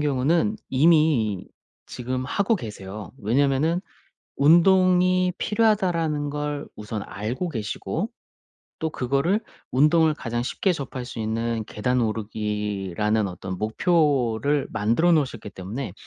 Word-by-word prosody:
경우는 150 +9 +1
이미 140 - +3 0.4
지금 130 +1 -4
하고 200 - +1
계세요. 105 - -8
왜냐하면은 140 - +1 0.6
'운동이 185 +3 +4
필요하다.'라는 175 -9 +1
걸 145 0 -3
우선 105 0 -5
알고 120 - -4
계시고 135 - -3 0.7
또 160 - -1
그거를 140 - 0 0.3
운동을 155 +4 +4
가장 120 -4 -3
쉽게 185 +8 0
접할 130 -3 -5
수 120 - -8
있는 115 +1 -1
계단 125 +4 0
오르기라는 105 -2 -1
어떤 90 +1 -6
목표를 140 - +1
만들어 115 +11 +2
놓으셨기 130 -9 0
때문에 100 +4 -6
130 Hz, 270 characters per minute, -24 LUFS, 110-165 Hz, 0.7 s, 운동이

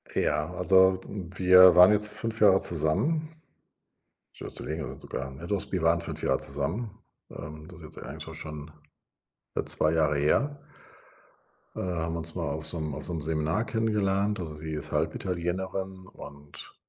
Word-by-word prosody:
Ja, 75 +2 0
also, 95 +1 +4
w 95 -3 -7
wir 90 -1 +8
waren 90 +2 +9
jetzt 105 0 0
5 115 0 -4
Jahre 95 -2 +7
zusammen. 100 - 0 1.0
Schon - - -8
so - - -9
länger 80 0 -4
schon - - -9
sogar. 65 - -5
Ah, - - -8
ne, 75 +6 -9
doch, 100 0 -2
wir 90 -3 -1
waren 85 +1 +3
5 85 - -6
Jahre 65 - +2
zusammen, 75 - -3 0.4
ähm. 75 +1 -9
Das 90 -3 -12
ist 80 0 -11
jetzt - - -11
eigentlich 80 +4 -7
so 80 - -9
schon 75 -1 -8 1.0
2 80 +1 +1
Jahre 75 -2 +2
her. 140 - +1 1.2
Ähm, - - -4 0.2
haben 80 +1 -2
uns 80 0 -3
mal 85 -3 -2
auf 75 +1 -4
so 85 - -2
'nem 75 -2 -3
auf - - -6
so - - -2
'nem 80 - -3
Seminar 80 +7 0
kennengelernt. 105 -2 0
Also, 80 -4 -5
sie 80 +1 -6
ist 75 - -5
Halbitalienerin 95 +1 -2
und 70 -4 -12
85 Hz, 175 wpm, -28 LUFS, 75-95 Hz, 1.2 s, waren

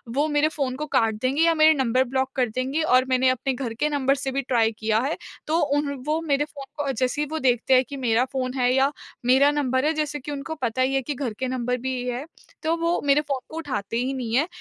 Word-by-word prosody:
वो 290 +2 +2
मेरे 295 0 +2
फ़ोन 280 -5 -2
को 300 +3 -4
काट 225 -1 +3
देंगे 265 +4 +1
या 335 0 +5
मेरे 315 0 +6
नंबर 260 -3 +2
ब्लॉक 265 +1 -1
कर 250 -3 +1
देंगे। 260 +7 -1
और 255 -4 +4
मैंने 255 0 +3
अपने 260 +1 0
घर 245 -3 -4
के 300 - +2
नंबर 275 -2 +1
से 270 -1 -3
भी 275 - -1
ट्राई 235 -4 +2
किया 220 0 +1
है। 310 - -2 0.3
तो 315 +2 +2 0.2
उन 290 -1 -1
वो 310 +1 +1
मेरे 285 0 +2
फ़ोन 285 -2 -10 0.2
को 275 - 0
जैसे 255 +3 -1
ही 300 - -1
वो 315 - -2
देखते 250 -1 +2
हैं 255 0 +6
कि 280 - -6
मेरा 245 -1 +2
फ़ोन 255 -1 -2
है 250 0 +3
या 270 +2 +3 0.3
मेरा 265 +3 +5
नंबर 260 -2 0
है 310 - +2
जैसे 300 -1 -2
कि 290 +2 -7
उनको 290 +3 -5
पता 255 -3 -2
ही 265 +1 +2
है 270 - +2
कि 290 +3 -3
घर 245 -4 -3
के 260 - -1
नंबर 250 -1 -1
भी 260 0 -1
है। 250 +3 -3 0.4
तो 320 +1 +1
वो 335 +1 0
मेरे 285 +1 +4
फ़ोन 280 -3 -3
को 315 - -8
उठाते 240 -9 -3
ही 255 +3 -1
नहीं 240 -4 -3
हैं। 290 +6 +3
265 Hz, 260 wpm, -24 LUFS, 255-295 Hz, 0.4 s, मेरे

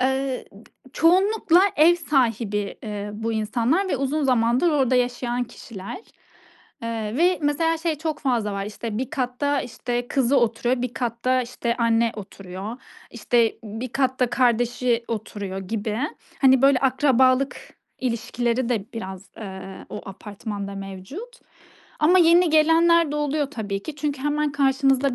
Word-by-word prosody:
Eee, 265 0 0
d 200 +3 -17 0.2
çoğunlukla 365 +2 +4 0.2
ev 320 +3 +6
sahibi, 230 - 0
eee, 210 -1 -5
bu 225 +2 -3
insanlar 235 - 0
ve 280 - 0
uzun 275 +3 -1
zamandır 250 +5 +3
orada 265 -4 +2
yaşayan 245 0 0
kişiler, 220 - -9 0.8
eee, 225 -1 -3
ve 355 +4 +3
mesela 325 +3 +1
şey 325 0 -1
çok 315 -1 -3
fazla 235 -6 0
var: 200 0 -3
İşte, 215 +1 -5
bir 260 +1 -3
katta, 280 0 -1
işte, 245 0 -4
kızı 270 0 +2
oturuyor, 240 +2 0
bir 250 -1 -3
katta, 250 +1 0
işte, 235 -1 -3
anne 230 -1 +2
oturuyor, 195 +1 -7 0.3
işte, 235 -1 +1
bir 225 +4 -5
katta 260 -2 +1
kardeşi 245 -1 +1
oturuyor 205 -3 -4
gibi. 210 +2 -3 0.4
Hani, 265 -1 +5
böyle, 275 -1 +5
akrabalık 260 0 +3 0.4
ilişkileri 235 0 -1
de 225 -6 0
biraz, 190 -3 -7
eee, 190 -2 -8
o 210 - -7
apartmanda 200 0 -6
mevcut 195 - -8 0.6
ama 340 +5 +5
yeni 340 0 +5
gelenler 325 +1 +4
de - - -2
oluyor 295 -1 -1
tabii 200 -6 -4
ki. 310 -2 -7
Çünkü 290 -3 -3
hemen 295 0 0
karşımızda 270 -1 +2
250 Hz, 140 wpm, -23 LUFS, 225-285 Hz, 0.8 s, ev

